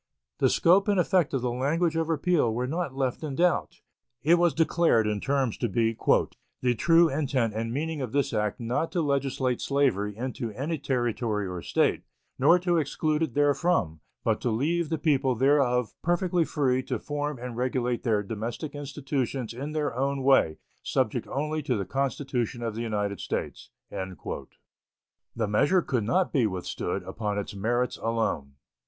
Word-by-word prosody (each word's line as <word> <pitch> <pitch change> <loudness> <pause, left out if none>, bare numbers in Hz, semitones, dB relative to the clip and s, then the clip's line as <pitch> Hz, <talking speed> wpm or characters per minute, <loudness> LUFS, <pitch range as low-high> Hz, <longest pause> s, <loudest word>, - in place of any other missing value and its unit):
The - - +4
scope 190 +4 +4
and 200 -2 +3
effect 180 -3 +2
of 135 -3 -1
the 125 - 0
language 155 +7 0
of 165 0 0
repeal 160 -5 +2
were 120 +3 -1
not 155 0 -3
left 135 +1 -1
in 145 -3 -3
doubt. 170 - +1 0.4
It 170 +3 +5
was 175 -2 +3
declared 165 -8 +3
in 105 -1 0
terms 135 -1 0
to 120 - 0
be 115 +2 +1 0.7
"the 125 -1 +2
true 165 +7 +5
intent 135 -6 0
and 115 +1 -3
meaning 155 +3 -2
of 125 -4 -4
this 140 -2 0
act 105 -2 -1
not 125 +7 -1
to 175 - +1
legislate 135 -3 0
slavery 110 -8 +1
into 125 -1 -4
any 150 +7 -3
Territory 120 -5 -1
or 90 -1 -5
State, - - +1 0.4
nor 150 +7 +6
to 175 -1 +1
exclude 155 0 0
it 155 -8 -1
therefrom, 145 - +2 0.2
but - - +1
to 125 - 0
leave 155 +8 0
the 160 - 0
people 140 -4 +2
thereof 125 -3 +2
perfectly 175 0 +1
free 130 -5 +1
to 125 -1 -3
form 145 +3 -3
and 120 -1 -6
regulate 125 -1 -1
their 110 -4 +1
domestic 115 +8 -5
institutions 140 -4 -3
in 140 +5 -5
their 150 -6 -1
own 135 +1 -1
way, 130 - +4 0.2
subject - - -1
only 150 +3 -2
to 130 -5 -1
the 100 - -2
Constitution 130 -1 -2
of 115 -2 -2
the 115 - -4
United 105 -3 -2
States." - - -4 0.2
The 95 +3 -8
measure 155 - +3
could 125 -5 -1
not 150 - +1
be 125 -7 +3
withstood 95 -3 -3
upon 105 -2 -3
its 100 - -4
merits 120 +5 0
alone. 110 -12 -1
130 Hz, 170 wpm, -27 LUFS, 115-150 Hz, 0.7 s, nor